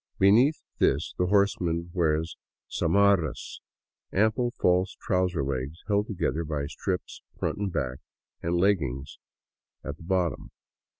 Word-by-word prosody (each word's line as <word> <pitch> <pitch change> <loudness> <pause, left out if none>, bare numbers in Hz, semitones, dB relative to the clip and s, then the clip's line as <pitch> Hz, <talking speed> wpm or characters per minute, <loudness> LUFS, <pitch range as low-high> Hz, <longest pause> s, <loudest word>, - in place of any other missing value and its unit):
Beneath 120 +10 +4 0.2
this 75 +4 +2
the 90 - +2
horseman 90 -4 +1
wears 80 -2 +1 0.4
zamarras, 95 -4 +2 0.5
ample 110 +5 +2
false 90 +1 +2
trouser 90 -5 0
legs 70 +4 -4
held 105 0 +1
together 85 -4 -1
by 75 -2 -2
strips 90 +5 -4 0.2
front - - -2
and 100 -2 -1
back, 65 -5 -2 0.4
and 85 +1 0
legging 85 -9 +2 0.8
like - - -3
at 75 - -11
the - - -13
bottom. 90 -1 -1
90 Hz, 125 wpm, -27 LUFS, 80-100 Hz, 0.8 s, Beneath